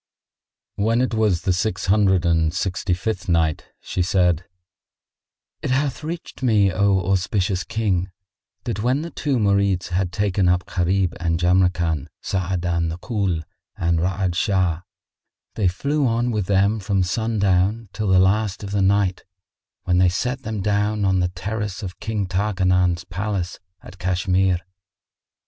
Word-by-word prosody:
When 115 Hz, +3 st, +2 dB
it 125 Hz, -2 st, 0 dB
was 105 Hz, -5 st, +1 dB
the 95 Hz, -3 st, +2 dB
Six 95 Hz, +2 st, -1 dB
Hundred 95 Hz, -3 st, +3 dB
and 80 Hz, -2 st, +2 dB
Sixty 95 Hz, +1 st, -1 dB
fifth 95 Hz, 0 st, -3 dB
Night, 80 Hz, -3 st, +1 dB
She -, -, -3 dB
said, 90 Hz, -1 st, +2 dB, 1.2 s
It -, -, -3 dB
hath 135 Hz, +2 st, 0 dB
reached 165 Hz, 0 st, -6 dB
me, 105 Hz, -6 st, +3 dB
O 95 Hz, +1 st, +2 dB
auspicious 95 Hz, 0 st, 0 dB
King, 100 Hz, -5 st, -1 dB, 0.5 s
that 105 Hz, -, -3 dB
when 130 Hz, +6 st, +1 dB
the 170 Hz, -, -6 dB
two 140 Hz, -4 st, -1 dB
Marids 100 Hz, -4 st, +1 dB
had 90 Hz, 0 st, -1 dB
taken 95 Hz, -1 st, +1 dB
up 90 Hz, 0 st, +1 dB
Gharib 90 Hz, 0 st, 0 dB
and 85 Hz, -1 st, 0 dB
Jamrkan, 90 Hz, -4 st, +2 dB
Sa'adan 85 Hz, -3 st, -1 dB
the 80 Hz, -, -4 dB
Ghul 95 Hz, -6 st, -1 dB, 0.3 s
and 85 Hz, -1 st, +1 dB
Ra'ad 90 Hz, +1 st, 0 dB
Shah, 90 Hz, -3 st, +1 dB, 0.7 s
they 105 Hz, -4 st, +1 dB
flew 140 Hz, +10 st, 0 dB
on 120 Hz, +1 st, 0 dB
with 105 Hz, -5 st, -1 dB
them 100 Hz, +2 st, +2 dB
from 100 Hz, -1 st, 0 dB
sundown 100 Hz, +1 st, +1 dB
till 110 Hz, -2 st, -2 dB
the 95 Hz, -1 st, +4 dB
last 95 Hz, +2 st, +2 dB
of 100 Hz, -, -5 dB
the 100 Hz, -1 st, +1 dB
Night, 95 Hz, -1 st, +2 dB, 0.6 s
when 90 Hz, 0 st, +2 dB
they 90 Hz, -1 st, +5 dB
set 125 Hz, +9 st, -2 dB
them 110 Hz, -5 st, -4 dB
down 105 Hz, +1 st, 0 dB
on 95 Hz, -1 st, +2 dB
the 90 Hz, -, +2 dB
terrace 105 Hz, +3 st, -4 dB
of 95 Hz, -1 st, -7 dB
King 105 Hz, -2 st, -2 dB
Tarkanan's 90 Hz, -2 st, +1 dB
palace 95 Hz, +1 st, -3 dB, 0.2 s
at 95 Hz, -, -13 dB
Cashmere. 90 Hz, 0 st, +1 dB
95 Hz, 150 wpm, -22 LUFS, 90-105 Hz, 1.2 s, they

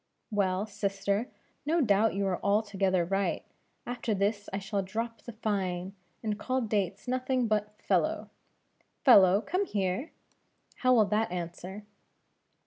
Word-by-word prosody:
"Well, 195 Hz, -1 st, +1 dB
sister, 200 Hz, +1 st, -1 dB, 0.4 s
no 320 Hz, +4 st, +1 dB
doubt 220 Hz, -5 st, +3 dB
you 200 Hz, 0 st, 0 dB
are 185 Hz, -2 st, -1 dB
altogether 200 Hz, -3 st, +2 dB
right; 195 Hz, +2 st, -1 dB, 0.4 s
after 240 Hz, -3 st, -2 dB
this 205 Hz, +1 st, -1 dB
I 195 Hz, -, -2 dB
shall 200 Hz, 0 st, -2 dB
drop 230 Hz, +5 st, -4 dB
the 235 Hz, -, -8 dB
fine, 195 Hz, -4 st, -2 dB, 0.3 s
and 215 Hz, -1 st, -2 dB
call 255 Hz, +3 st, 0 dB
Dates 210 Hz, -2 st, -1 dB
nothing 255 Hz, 0 st, 0 dB
but 210 Hz, -1 st, -1 dB
fellow; -, -, 0 dB, 0.7 s
Fellow, 195 Hz, -6 st, +7 dB
come 370 Hz, +8 st, -1 dB
here! 195 Hz, -, -1 dB, 0.7 s
how 255 Hz, 0 st, +4 dB
will 220 Hz, -3 st, +5 dB
that 210 Hz, +3 st, +1 dB
answer?" 180 Hz, +3 st, -6 dB
205 Hz, 135 wpm, -30 LUFS, 195-225 Hz, 0.7 s, Fellow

